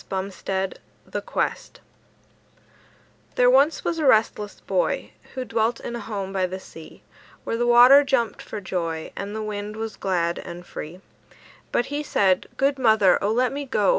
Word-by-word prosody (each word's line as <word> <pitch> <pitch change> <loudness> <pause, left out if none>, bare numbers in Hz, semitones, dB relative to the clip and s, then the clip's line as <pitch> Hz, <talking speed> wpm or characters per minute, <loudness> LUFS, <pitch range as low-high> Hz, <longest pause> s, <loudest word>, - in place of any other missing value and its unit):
LONGFELLOW 190 0 -3 0.3
THE - - -4
QUEST - - -3 1.6
There 250 0 +5
once 280 +5 +3
was 335 -1 -1
a 310 - 0
restless 215 -3 +2
boy - - -1 0.2
Who 260 -1 -3
dwelt 230 0 0
in 240 - -6
a - - -4
home 200 -3 -5
by 190 -1 +1
the 185 +1 -6
sea, 165 -3 -13 0.4
Where - - -2
the 240 +1 0
water 250 +4 +8
danced 240 -6 0
for 215 - -7
joy, 170 -4 -4
And 200 +2 -5
the 220 - -3
wind 210 0 -5
was 220 -1 -5
glad 175 -3 -1
and 175 0 -9
free; 175 +3 -8 0.7
But 240 - +1
he 290 - -1
said: 190 -10 +1
"Good 275 0 +1
mother, 220 -7 +4
O 205 - +1
let 250 +3 +2
me 285 +1 -3
go! 210 -7 +1
215 Hz, 165 wpm, -24 LUFS, 190-245 Hz, 1.6 s, water